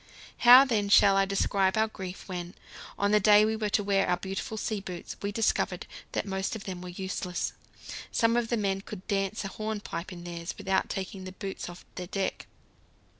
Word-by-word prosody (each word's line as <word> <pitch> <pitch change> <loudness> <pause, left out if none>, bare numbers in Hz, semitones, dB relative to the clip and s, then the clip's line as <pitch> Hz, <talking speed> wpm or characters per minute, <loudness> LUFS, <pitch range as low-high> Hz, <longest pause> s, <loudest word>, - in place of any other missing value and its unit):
How, 250 +3 +9
then, 210 -6 0
shall 200 -1 +7
I 195 0 +4
describe 195 0 +1
our 220 0 +3
grief 190 -3 -8
when, 180 -1 -6 0.4
on 200 0 +1
the 210 - +5
day 210 +1 +6
we 220 0 0
were 215 -1 -1
to 205 - +1
wear 195 -1 +2
our 180 - +2
beautiful 195 +4 -5
sea 215 0 -2
boots, 180 -3 -7
we 200 - -2
discovered 225 +2 0 0.3
that - - -1
most 190 +1 -2
of 215 - -7
them 185 -2 -6
were 180 - -7
useless? 180 0 -3 0.6
Some 230 0 +3
of 240 -1 +1
the 235 - 0
men 195 -2 0
could 200 -1 -9
dance 195 0 -1
a - - -3
hornpipe 210 -5 -5
in 175 -1 -9
theirs 170 -1 -6
without 190 0 0
taking 190 0 -5
the 185 - -7
boots 195 -1 -6
off 175 +1 -11
the 180 -1 -6
deck. 195 +1 -3
195 Hz, 200 wpm, -29 LUFS, 185-210 Hz, 0.6 s, How